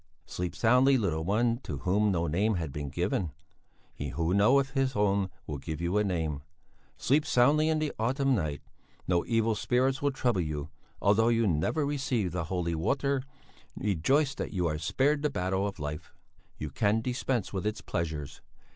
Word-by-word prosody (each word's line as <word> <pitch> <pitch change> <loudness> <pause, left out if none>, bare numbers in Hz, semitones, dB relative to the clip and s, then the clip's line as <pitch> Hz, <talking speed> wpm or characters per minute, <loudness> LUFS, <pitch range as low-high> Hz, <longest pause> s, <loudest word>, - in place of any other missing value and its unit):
"Sleep 90 -1 -4
soundly, 125 +4 +4
little 85 -8 -1
one, 115 +6 +1
to 75 - -6
whom 100 +8 +1
no 85 -2 0
name 100 +7 +1
had 80 -5 -3
been 75 -1 -4
given. 85 +2 -1 0.6
He 70 - -5
who 80 +6 -1
knoweth 130 +7 +4
His 135 -1 0
own 100 -1 +2 0.2
will 75 -2 -5
give 75 +3 -5
you 85 +4 +1
a - - +2
name; 80 -7 -2 0.6
sleep 145 +3 +2
soundly 150 +2 +3
in 160 - +2
the 155 -1 -1
autumn 135 +4 +1
night, 75 - -2 0.4
no 90 -2 +2
evil 115 -1 +2
spirits 130 +5 +1
will 145 - +2
trouble 120 -7 0
you, 75 -3 -4 0.3
although 105 +3 +4
you 115 -1 +3
never 95 - +1
received 130 - -1
the 85 -2 -2
holy 85 -1 -2
water; 135 - 0 0.5
rejoice 135 - +1
that - - -5
you 90 -4 -1
are 75 -2 -1
spared 140 - +1
the 150 - +1
battle 95 -4 -1
of 100 - -6
life; 75 +1 -6 0.4
you 75 -2 -5
can 105 +6 +1
dispense 125 -3 -2
with 95 +1 -2
its 105 - -3
pleasures. 80 -4 -4
100 Hz, 175 wpm, -29 LUFS, 85-130 Hz, 0.6 s, soundly